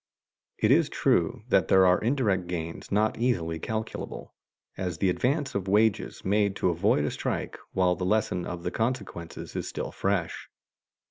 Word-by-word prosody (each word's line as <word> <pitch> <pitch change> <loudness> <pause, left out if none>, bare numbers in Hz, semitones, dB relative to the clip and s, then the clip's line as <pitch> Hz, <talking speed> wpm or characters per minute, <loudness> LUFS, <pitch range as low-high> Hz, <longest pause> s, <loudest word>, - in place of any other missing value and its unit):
It - - +2
is - - +4
true - - +1
that - - +3
there 95 0 +6
are 90 0 +4
indirect 105 -7 +1
gains 85 -2 -5
not 105 +2 +1
easily 85 -10 0
calculable, 110 +5 -5 0.4
as 90 -4 -3
the 95 +2 +2
advance 140 - 0
of 100 -1 -2
wages 105 +2 +1
made 100 0 +2
to 90 - +1
avoid 85 -3 +2
a 75 - -1
strike - - -3
while 90 -1 +3
the 90 - -4
lesson 95 -2 +1
of 85 -1 -6
the 90 - -2
consequences 110 -8 -4
is - - -3
still - - -4
fresh. 95 -4 -2
95 Hz, 160 wpm, -27 LUFS, 90-110 Hz, 0.4 s, there